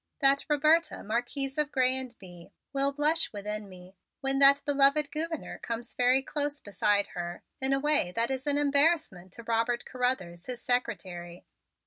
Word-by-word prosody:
That 275 -1 +3
Roberta, 310 +3 +2
Marquise 265 +6 -2
of 300 -1 0
Grez 255 -1 +2
and 260 -2 -5
Bye, 175 -3 -13 0.2
will 275 0 +3
blush 305 +3 +1
within 210 0 -5
me, 185 0 -14 0.3
when 270 0 0
that 280 0 +6
beloved 280 +1 +3
Gouverneur 320 +1 -3
comes 230 +1 -5
very 255 +2 +3
close 290 0 -2
beside 205 -1 0
her, 175 -2 -6 0.2
in 265 +1 +3
a 275 - +2
way 295 -10 +2
that 230 +2 +1
is 265 +1 -4
an 290 0 +2
embarrassment 285 - +1
to 235 - -8
Robert 230 +1 -1
Carruthers, 245 -10 -3
his 250 -1 -5
secretary. 185 -9 -3
260 Hz, 160 wpm, -28 LUFS, 210-285 Hz, 0.3 s, that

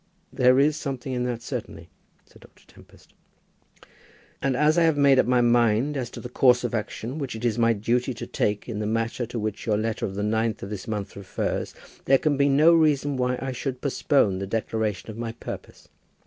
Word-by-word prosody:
"There 125 0 +4
is 150 +2 +3
something 135 -2 -4
in 125 0 -1
that, 120 -1 -3
certainly," 105 -11 -7 0.3
said - - -21
Dr. - - -20
Tempest. - - -20 1.3
"And 135 -2 0
as 155 +3 +3
I - - +3
have 160 -3 +3
made 140 -2 +5
up - - +3
my 125 -1 +3
mind 120 +3 +2
as 125 -4 -3
to - - -9
the - - -7
course 125 0 +3
of 120 - -2
action 115 +5 -4
which 135 -5 -4
it 110 +2 -5
is 120 0 0
my 115 0 +4
duty 120 +5 0
to - - -6
take 105 0 -2
in 110 -4 -4
the 105 - -2
matter 115 +2 -1
to 120 - -6
which 110 0 -4
your 105 -2 +2
letter 110 +1 -2
of 95 - -7
the 100 - -2
9th 110 +1 -1
of 100 - -7
this 105 +1 -6
month 105 -2 -4
refers, 100 -2 -3 0.3
there 135 - +5
can 150 +1 0
be 140 +1 +3
no 150 +5 +5
reason 145 -3 +2
why 125 0 0
I 135 - -3
should 130 0 -4
postpone 130 -8 +1
the 100 - -4
declaration 110 -1 -2
of 110 - -10
my 115 -1 -4
purpose. - - -9
120 Hz, 215 wpm, -25 LUFS, 110-135 Hz, 1.3 s, made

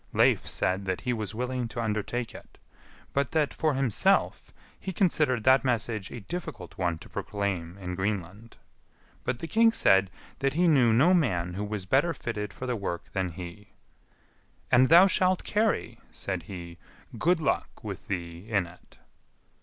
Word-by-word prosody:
Leif - - +3
said 95 +2 -1
that 95 -1 -2
he 125 -1 -1
was 110 -2 -4
willing 125 0 -2
to 120 +1 -7
undertake 110 +2 -2
it, - - -13 0.6
but 140 -1 +1
that, 155 -3 +1
for 155 -3 0
himself, 130 -5 +1 0.3
he 190 - -4
considered 155 - +1
that 130 +2 +5
message 115 -5 -1
a 120 - -8
difficult 150 - -7
one 85 -2 -1
to - - -13
proclaim 100 -4 -3
in 90 -2 -5
Greenland. 100 +3 -4 0.7
But 125 - -1
the 165 - -6
king 225 +4 +4
said 95 - +4 0.3
that 135 0 +1
he 175 +2 +3
knew 130 -8 +5
no 140 +11 +5
man 90 - +1
who 100 +3 -3
was 105 -2 -4
better 140 - +2
fitted 105 -5 -4
for 130 - -7
the 125 -1 -1
work 95 -5 -5
than 95 -2 -1
he. 90 +4 -10 1.0
"And 130 +1 +6
thou 170 +4 +9
shalt 185 -1 +2
carry," 215 +1 0
said 95 -3 -4
he, 85 -3 -8 0.4
"good 175 +5 +3
luck 155 - -2
with - - -7
thee 85 0 -5
in 100 -5 +2
it." 85 +1 -17
110 Hz, 165 wpm, -28 LUFS, 95-135 Hz, 1.0 s, thou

